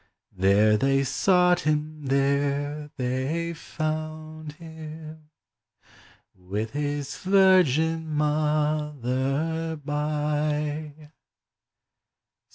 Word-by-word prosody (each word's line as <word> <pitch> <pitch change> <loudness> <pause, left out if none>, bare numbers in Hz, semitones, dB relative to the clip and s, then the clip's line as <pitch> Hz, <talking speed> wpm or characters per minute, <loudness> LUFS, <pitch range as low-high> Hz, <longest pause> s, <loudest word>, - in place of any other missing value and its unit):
There 100 +3 +4
they 135 +2 +2
sought 180 +5 +3
him, 150 -1 -2
there 140 +2 0
they 135 +7 -1
found 155 -1 -5
him, 160 -1 -10 1.0
With 100 +5 -4
his 145 -1 -3
Virgin 165 -5 +3
Mother 150 0 0
by. 150 0 -2
150 Hz, 60 wpm, -26 LUFS, 140-155 Hz, 1.0 s, There